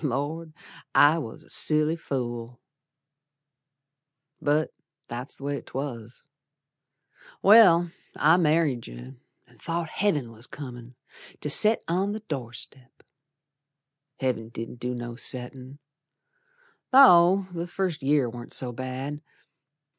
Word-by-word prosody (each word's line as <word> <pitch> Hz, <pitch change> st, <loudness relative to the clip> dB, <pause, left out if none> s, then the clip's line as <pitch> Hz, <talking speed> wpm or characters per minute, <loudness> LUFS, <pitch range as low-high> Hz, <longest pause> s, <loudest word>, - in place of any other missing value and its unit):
Lord! 155 Hz, +4 st, -3 dB, 0.4 s
I 150 Hz, +3 st, +6 dB
was 115 Hz, -8 st, -8 dB
a -, -, -23 dB
silly 155 Hz, +1 st, +2 dB
fool. 120 Hz, -6 st, -5 dB, 1.8 s
But 150 Hz, +2 st, 0 dB, 0.3 s
that's 120 Hz, +3 st, -7 dB
the -, -, -14 dB
way 140 Hz, 0 st, -3 dB
'twas. 125 Hz, -4 st, -7 dB, 1.2 s
Well, 180 Hz, -5 st, +7 dB, 0.3 s
I 160 Hz, +3 st, +5 dB
married 155 Hz, -7 st, +1 dB
yer -, -, -11 dB, 0.3 s
An' -, -, -25 dB
thought 165 Hz, -1 st, -3 dB
Heav'n 150 Hz, -, -1 dB
was 115 Hz, +2 st, -14 dB
comin' 125 Hz, -3 st, -10 dB, 0.5 s
To 150 Hz, -, -3 dB
set 215 Hz, +8 st, +5 dB
on 190 Hz, +4 st, 0 dB
the 215 Hz, -, -6 dB
door 135 Hz, -, -5 dB
step. 130 Hz, +1 st, -11 dB, 1.2 s
Heav'n 125 Hz, -4 st, -2 dB
didn't 115 Hz, +1 st, -8 dB
do 125 Hz, +1 st, -3 dB
no 120 Hz, -1 st, -6 dB
settin', 130 Hz, +2 st, -3 dB, 1.1 s
Though 195 Hz, -8 st, +7 dB
the 170 Hz, 0 st, -4 dB
first 175 Hz, -3 st, -3 dB
year 140 Hz, -1 st, +2 dB
warn't 120 Hz, +1 st, -9 dB
so 125 Hz, -2 st, -2 dB
bad. 130 Hz, +4 st, -6 dB
140 Hz, 115 wpm, -26 LUFS, 120-165 Hz, 1.8 s, Well